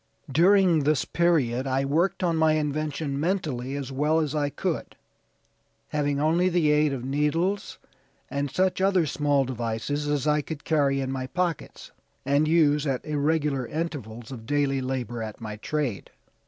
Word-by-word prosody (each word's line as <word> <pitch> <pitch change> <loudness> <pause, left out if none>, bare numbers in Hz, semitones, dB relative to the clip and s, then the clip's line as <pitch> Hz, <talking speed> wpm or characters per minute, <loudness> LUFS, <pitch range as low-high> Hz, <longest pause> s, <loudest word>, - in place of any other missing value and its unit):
During 180 +2 +5
this 150 -1 +1
period 140 -7 +1
I 135 +1 0
worked 165 +8 +1
on 170 -2 +2
my 160 -1 +3
invention 150 -1 -2
mentally 145 -7 -2
as 140 -2 -5
much 150 +4 +2
as 150 -1 -3
I 145 -2 0
could, - - -3 0.9
having 145 -1 0
only 165 +5 +2
the 170 -4 +2
aid 150 0 +3
of 130 -2 -4
needles 155 +8 -1 0.5
and 140 +1 -2
such 185 +5 0
other 190 -3 +3
small 145 -1 +1
devices 125 +4 -3
as 145 -1 0
I 150 0 +2
could 145 0 -7
carry 140 -3 +1
in 130 0 -3
my 130 -1 -3
pockets, 175 0 -3 0.3
and 140 +3 +2
use 150 -2 +3
at 135 -2 -2
irregular 150 -3 0
intervals 135 -8 -5
of 115 -4 -9
daily 140 -1 +1
labor 125 -3 -3
at 110 -1 -6
my 105 -2 -6
trade. 130 -2 -3
145 Hz, 155 wpm, -26 LUFS, 135-160 Hz, 0.9 s, During